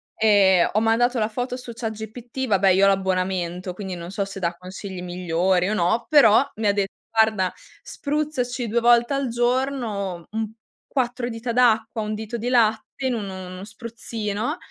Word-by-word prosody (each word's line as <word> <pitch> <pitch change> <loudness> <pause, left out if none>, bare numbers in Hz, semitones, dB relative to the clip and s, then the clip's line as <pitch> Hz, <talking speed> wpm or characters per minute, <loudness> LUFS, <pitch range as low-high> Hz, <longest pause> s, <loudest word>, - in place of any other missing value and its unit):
Ehm, 200 -5 +4
ho 210 - +2
mandato 235 +3 +2
la 215 - +1
foto 245 +3 -3
su 250 -2 -9
chatGPT, 225 +3 -5
vabbè 195 -3 +3
io 190 +1 +5
ho - - +6
l'abbonamento 185 -2 0
quindi 190 -1 -6
non 170 +1 -7
so 200 0 -1
se 195 0 -7
dà 170 -2 -1
consigli 185 +1 -8
migliori 180 +1 0
o - - 0
no, 200 +4 +1
però 235 -9 +6
mi 215 0 -1
ha - - +5
de 200 -1 0 0.2
"Guarda: 220 -4 +2 0.3
spruzzaci 280 -5 -2
2 235 +3 +2
volte 240 +2 +4
al 275 -1 0
giorno 240 -7 -1
un 220 0 -2 0.4
quattro 245 -2 -1
dita 235 0 -4
d'acqua, 225 -2 +2
1 215 0 -3
dito 220 +2 -5
di 235 +2 -4
latte 235 +1 +1
in 255 - 0
un 215 -4 -3
uno 185 0 -8
spruzzino 225 - -4
220 Hz, 170 wpm, -23 LUFS, 190-240 Hz, 0.4 s, ho